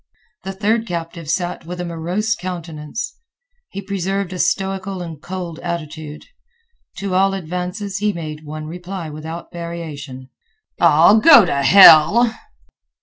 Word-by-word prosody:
The 195 Hz, -, -6 dB
third 220 Hz, +4 st, 0 dB
captive 165 Hz, -2 st, -6 dB
sat 175 Hz, +1 st, -2 dB
with 180 Hz, +1 st, -6 dB
a 180 Hz, -, -3 dB
morose 175 Hz, +6 st, -2 dB
countenance. 170 Hz, -2 st, -6 dB, 0.5 s
He 200 Hz, -, -7 dB
preserved 195 Hz, -1 st, -3 dB
a 180 Hz, -, -6 dB
stoical 195 Hz, 0 st, -1 dB
and 165 Hz, -4 st, -8 dB
cold 180 Hz, -3 st, -6 dB
attitude. 155 Hz, -3 st, -6 dB, 0.7 s
To 195 Hz, -1 st, -4 dB
all 195 Hz, +1 st, +2 dB
advances 180 Hz, +3 st, -5 dB
he 210 Hz, 0 st, +1 dB
made 155 Hz, -4 st, -7 dB
one 155 Hz, 0 st, -7 dB
reply 175 Hz, 0 st, -7 dB
without 160 Hz, +3 st, -8 dB
variation, 150 Hz, -7 st, -8 dB, 0.5 s
"Ah, 165 Hz, +2 st, +6 dB
go 285 Hz, -, +8 dB
t' -, -, -3 dB
hell!" 170 Hz, -, +7 dB
175 Hz, 130 wpm, -19 LUFS, 160-195 Hz, 0.7 s, go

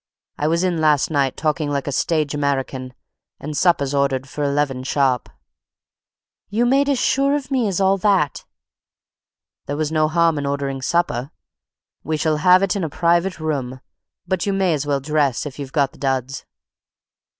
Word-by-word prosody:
I 150 Hz, -, +1 dB
was 165 Hz, +3 st, +1 dB
in 175 Hz, -3 st, 0 dB
last 150 Hz, -1 st, +3 dB
night, 140 Hz, -3 st, 0 dB
talking 150 Hz, -1 st, -1 dB
like 140 Hz, -1 st, -2 dB
a 145 Hz, -, -2 dB
stage 155 Hz, +1 st, 0 dB
American, 135 Hz, -3 st, -2 dB, 0.4 s
and 150 Hz, +1 st, -6 dB
supper's 145 Hz, -5 st, +2 dB
ordered 140 Hz, -1 st, 0 dB
for 145 Hz, +1 st, -4 dB
eleven 140 Hz, -2 st, 0 dB
sharp." 130 Hz, -2 st, 0 dB, 1.2 s
"You 225 Hz, +4 st, +1 dB
made 275 Hz, +3 st, +3 dB
as 280 Hz, -, +2 dB
sure 275 Hz, +3 st, +2 dB
of 280 Hz, -2 st, -5 dB
me 255 Hz, -5 st, +1 dB
as 195 Hz, -2 st, -1 dB
all 195 Hz, 0 st, +3 dB
that!" 190 Hz, -7 st, +1 dB, 1.2 s
"There 145 Hz, -, -3 dB
was 155 Hz, 0 st, -1 dB
no 155 Hz, -1 st, +2 dB
harm 165 Hz, -1 st, +2 dB
in 140 Hz, -, -3 dB
ordering 140 Hz, -1 st, -2 dB
supper. 140 Hz, -4 st, 0 dB, 0.7 s
We 155 Hz, 0 st, -1 dB
shall 155 Hz, 0 st, +1 dB
have 180 Hz, +5 st, +5 dB
it 195 Hz, +1 st, +1 dB
in 195 Hz, -, -2 dB
a 160 Hz, -, -2 dB
private 170 Hz, +4 st, +1 dB
room, 135 Hz, -5 st, -3 dB, 0.5 s
but 190 Hz, +1 st, -1 dB
you 200 Hz, -, +1 dB
may 190 Hz, -3 st, +2 dB
as 145 Hz, -1 st, -2 dB
well 140 Hz, -1 st, 0 dB
dress 145 Hz, -2 st, 0 dB
if 145 Hz, -1 st, -8 dB
you've 135 Hz, -2 st, -6 dB
got 140 Hz, -3 st, +1 dB
the -, -, -19 dB
duds." 135 Hz, -1 st, -2 dB
150 Hz, 175 wpm, -21 LUFS, 140-175 Hz, 1.2 s, have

